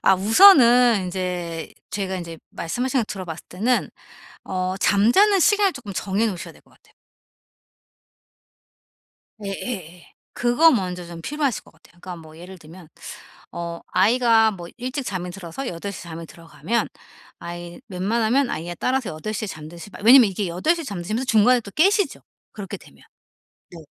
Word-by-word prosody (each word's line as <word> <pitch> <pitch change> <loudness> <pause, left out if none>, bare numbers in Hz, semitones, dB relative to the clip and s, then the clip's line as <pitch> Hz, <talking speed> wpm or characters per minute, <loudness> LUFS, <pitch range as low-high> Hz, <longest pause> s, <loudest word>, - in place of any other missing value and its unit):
아 195 - +5
우선은 240 - +6
인제 180 -3 -4 0.2
제가 190 -2 -3
인제 170 -2 -7
말씀하신 250 +10 -2
거 225 - -1
들어 190 -3 -6
봤을 165 -2 -8
때는 225 +8 0 0.5
어 185 0 -2
잠자는 365 - +4
시간을 405 +1 +3
조금 235 - -8
정해 195 +4 -1
놓으셔야 190 -6 -5
될 - - -20
것 - - -28
같아요. - - -27 2.5
예예예. 190 -4 -7 0.2
그거 245 +7 +4
먼저 180 - -2
좀 170 -1 -9
필요하실 290 - -2
것 - - -19
같아요. 175 - -24
그러니까 180 -1 -8
뭐 160 -1 -14
예를 180 +2 -11
들면 165 +1 -14 0.6
어 170 -1 -6
아이가 225 +2 +4
뭐 175 -4 -9
일찍 255 +3 -4
잠이 180 -3 -4
들어서 190 +8 -7
8 175 +4 -5
시에 - - -9
잠에 165 +1 -7
들어가면 165 +7 -3 0.5
아이 175 0 -8
웬만하면 225 +7 0
아이에 175 +2 -5
따라서 255 +3 -1
8 155 +8 -5
시에 215 +1 -3
잠드시 170 +2 -9
마 - - -11
왜냐면 240 -1 +8
이게 195 +1 -3
8 180 - +1
시에 335 - -6
잠 200 - -5
드시면서 215 +9 -3
중간에 245 +1 +4
또 200 - -11
깨시죠, 390 - +2 0.3
그렇게 205 -3 -7
되면. - - -19 0.7
네. 170 -2 -11
195 Hz, 325 characters per minute, -22 LUFS, 175-245 Hz, 2.5 s, 왜냐면